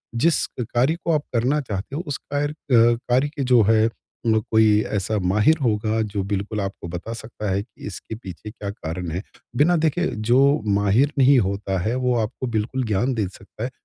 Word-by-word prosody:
जिस 160 Hz, +8 st, +3 dB
कार्य 125 Hz, +5 st, +1 dB
को 170 Hz, -, +2 dB
आप 150 Hz, -2 st, +1 dB
करना 125 Hz, +6 st, +2 dB
चाहते 105 Hz, 0 st, -5 dB
हो, 160 Hz, -, -2 dB
उस 145 Hz, -, -2 dB
कर 145 Hz, +1 st, -2 dB
अ, 120 Hz, -6 st, +3 dB
कार्य 130 Hz, +4 st, +3 dB
के 140 Hz, -, -1 dB
जो 125 Hz, -2 st, +5 dB
है 110 Hz, +1 st, +4 dB, 0.4 s
म 110 Hz, -1 st, +4 dB
कोई 110 Hz, -1 st, +5 dB
ऐसा 105 Hz, +1 st, 0 dB
माहिर 105 Hz, -, +3 dB
होगा 110 Hz, -1 st, +1 dB
जो 105 Hz, -2 st, -2 dB
बिल्कुल 100 Hz, +1 st, -2 dB
आपको 95 Hz, -3 st, -5 dB
बता 85 Hz, +6 st, -6 dB
सकता 110 Hz, -2 st, -6 dB
है 95 Hz, +1 st, 0 dB
कि 105 Hz, -2 st, -14 dB
इसके 105 Hz, +3 st, -7 dB
पीछे 105 Hz, -2 st, -9 dB
क्या 105 Hz, -3 st, -6 dB
कारण 90 Hz, -3 st, -5 dB
हैं। 90 Hz, +4 st, -3 dB, 0.4 s
बिना 170 Hz, +6 st, +4 dB
देखे 160 Hz, +2 st, +1 dB, 0.2 s
जो 125 Hz, +2 st, +6 dB, 0.3 s
माहिर 105 Hz, +7 st, +3 dB
नहीं 135 Hz, +1 st, +6 dB
होता 100 Hz, -1 st, -1 dB
हैं 110 Hz, +6 st, -1 dB
वो 125 Hz, -1 st, +1 dB
आपको 110 Hz, +4 st, -4 dB
बिल्कुल 115 Hz, +3 st, -1 dB
ज्ञान 110 Hz, +5 st, 0 dB
दे 110 Hz, -5 st, -1 dB
सकता 100 Hz, +3 st, -10 dB
हैं 125 Hz, -, -3 dB
110 Hz, 195 wpm, -23 LUFS, 100-130 Hz, 0.4 s, जो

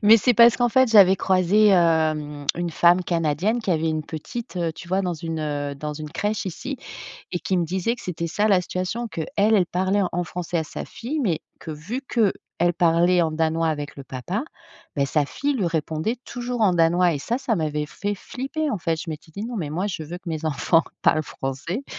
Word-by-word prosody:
Mais 215 Hz, +2 st, +8 dB
c'est 245 Hz, +3 st, +3 dB
parce 235 Hz, +1 st, +7 dB
qu'en 245 Hz, -1 st, +2 dB
fait, 260 Hz, 0 st, +4 dB
j'avais 195 Hz, -4 st, +8 dB
croisé, 190 Hz, +3 st, +3 dB
hem, 155 Hz, -5 st, +2 dB
une 175 Hz, -1 st, -2 dB
femme 175 Hz, +2 st, +4 dB
canadienne 170 Hz, -, 0 dB
qui 210 Hz, -, -2 dB
avait 160 Hz, -1 st, +1 dB
une 155 Hz, 0 st, -1 dB
petite, 180 Hz, +6 st, -6 dB, 0.2 s
tu 170 Hz, -, -11 dB
vois 190 Hz, +2 st, +1 dB
dans 180 Hz, -3 st, -1 dB
une, 165 Hz, 0 st, -4 dB
heu, 145 Hz, -2 st, -3 dB, 0.3 s
une 155 Hz, -1 st, -6 dB
crèche 205 Hz, +6 st, -2 dB
ici 200 Hz, -, -5 dB, 0.5 s
et 175 Hz, -, -2 dB
qui 190 Hz, -, -1 dB
me 175 Hz, -, +2 dB
disait 190 Hz, +7 st, -1 dB
que 245 Hz, -, -13 dB
c'était 170 Hz, -2 st, -3 dB
ça 205 Hz, +6 st, +1 dB
la 195 Hz, -3 st, +5 dB
situation. 185 Hz, +6 st, -3 dB
Qu'elle, 165 Hz, -7 st, -5 dB, 0.3 s
elle 190 Hz, -4 st, +4 dB
parlait 190 Hz, +3 st, +1 dB
en 175 Hz, +1 st, -1 dB
français 175 Hz, 0 st, -3 dB
à 160 Hz, -, -1 dB
sa -, -, -6 dB
fille 290 Hz, +7 st, -4 dB
mais, 175 Hz, -10 st, 0 dB, 0.2 s
que -, -, -7 dB
vu 165 Hz, -, -5 dB
qu'elle 200 Hz, -7 st, 0 dB
parlait 175 Hz, +1 st, +3 dB
en 160 Hz, -, 0 dB
danois 160 Hz, +1 st, 0 dB
avec 145 Hz, -2 st, -3 dB
le 140 Hz, -, -9 dB
papa, 135 Hz, -, -4 dB, 0.5 s
bah 140 Hz, -1 st, +2 dB
sa 150 Hz, +2 st, +1 dB
fille 280 Hz, -, -2 dB
lui 210 Hz, -9 st, 0 dB
répondait 160 Hz, +7 st, -1 dB
toujours 245 Hz, -1 st, -3 dB
en 200 Hz, -4 st, +5 dB
danois 170 Hz, +1 st, +3 dB
et 145 Hz, -, -2 dB
ça 240 Hz, -, -1 dB
ça 250 Hz, -4 st, 0 dB
m'avait 150 Hz, -4 st, -1 dB
fait 205 Hz, +7 st, -4 dB
flipper 275 Hz, +8 st, -4 dB
en 210 Hz, -, -1 dB
fait. 165 Hz, -1 st, -1 dB
Je 165 Hz, +2 st, -7 dB
m'étais 155 Hz, 0 st, -7 dB
dit: 200 Hz, +7 st, -6 dB
«Non 240 Hz, -1 st, -5 dB
mais 155 Hz, -6 st, -3 dB
moi, 180 Hz, +6 st, -1 dB
je 180 Hz, -6 st, -4 dB
veux 170 Hz, +4 st, -7 dB
que 180 Hz, -, -10 dB
mes 160 Hz, -1 st, -4 dB
enfants 160 Hz, +2 st, +2 dB, 0.2 s
parlent 155 Hz, -, +3 dB
français» 145 Hz, -, -5 dB
175 Hz, 215 wpm, -23 LUFS, 160-210 Hz, 0.5 s, Mais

